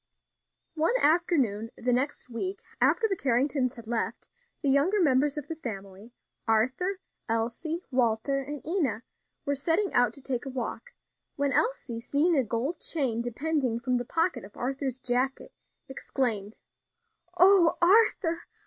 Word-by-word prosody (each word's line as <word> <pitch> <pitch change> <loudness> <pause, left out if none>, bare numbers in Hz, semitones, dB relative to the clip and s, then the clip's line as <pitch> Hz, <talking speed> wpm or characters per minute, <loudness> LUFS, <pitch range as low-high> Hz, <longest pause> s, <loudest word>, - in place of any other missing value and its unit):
One 330 +9 +1
afternoon, 285 - +2
the 245 +1 0
next 260 +3 -1
week 370 +12 -4 0.2
after 455 - +3
the 390 - -1
Carringtons 265 -2 0
had 235 -2 -11
left, 230 0 -3 0.3
the 280 - +2
younger 315 +10 +3
members 290 -2 +3
of 295 -1 -5
the 325 - -4
family, 200 -4 -8 0.4
Arthur, 260 - +1 0.3
Elsie, 240 +10 -2
Walter 250 +2 +1
and 280 +1 -7
Enna, 295 - -1 0.4
were 285 - +1
setting 325 +8 0
out 245 -2 +3
to 275 - -7
take 260 0 -3
a - - -3
walk, 265 - -5 0.4
when 285 -2 0
Elsie, 460 - 0
seeing 295 +8 +1
a 270 - +3
gold 240 +9 -2
chain 255 -8 +1
depending 250 0 -1
from 250 0 0
the 245 - -2
pocket 330 - 0
of 200 +2 -13
Arthur's 265 0 -3
jacket, 255 +2 -2 0.3
exclaimed: 230 -6 -2 0.8
"O 365 -2 +6
Arthur! 345 -3 +3
270 Hz, 140 wpm, -28 LUFS, 235-325 Hz, 0.8 s, O